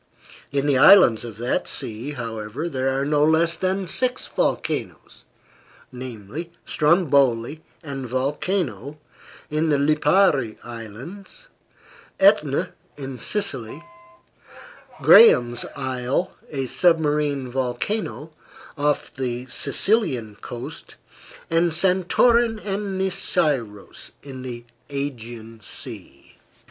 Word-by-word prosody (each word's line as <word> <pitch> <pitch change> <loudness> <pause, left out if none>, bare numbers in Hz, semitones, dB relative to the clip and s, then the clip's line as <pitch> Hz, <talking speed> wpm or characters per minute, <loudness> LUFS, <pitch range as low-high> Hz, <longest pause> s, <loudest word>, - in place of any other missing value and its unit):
In 140 0 0
the 140 -3 +3
islands 135 - +7
of 115 -3 -8
that 120 +2 -1
sea, 115 +6 -4
however 115 +3 -5
there 135 -4 -1
are 140 - -1
no 145 0 +2
less 165 +2 +4
than 190 +2 -1
six 250 +8 +1
volcanoes: - - -3 0.7
namely, 125 - -7
Stromboli, 145 -4 +2 0.2
and 135 -4 -6
Vulcano, 140 - -2 0.5
in 155 +1 +1
the 145 - +3
Lipari 150 - +2
Islands; 120 - -10 0.7
Etna, 190 -8 +3 0.2
in 135 -3 -7
Sicily; 135 - -3 1.2
Graham's 120 - +7
Isle, 130 +7 -2
a 135 -3 -3
submarine 150 -3 +1
volcano, 150 - -3 0.5
off 145 0 0
the 125 -2 -3
Sicilian 140 - 0
coast; 120 0 -8 0.6
and 165 0 +2
Santorin 220 +6 +3
and 200 -1 -3
Nisyros, 140 - -1
in 135 -2 -9
the 120 -2 -7 0.2
Aegean 120 -5 -6
Sea. 70 -7 -7
140 Hz, 95 wpm, -23 LUFS, 120-170 Hz, 1.2 s, islands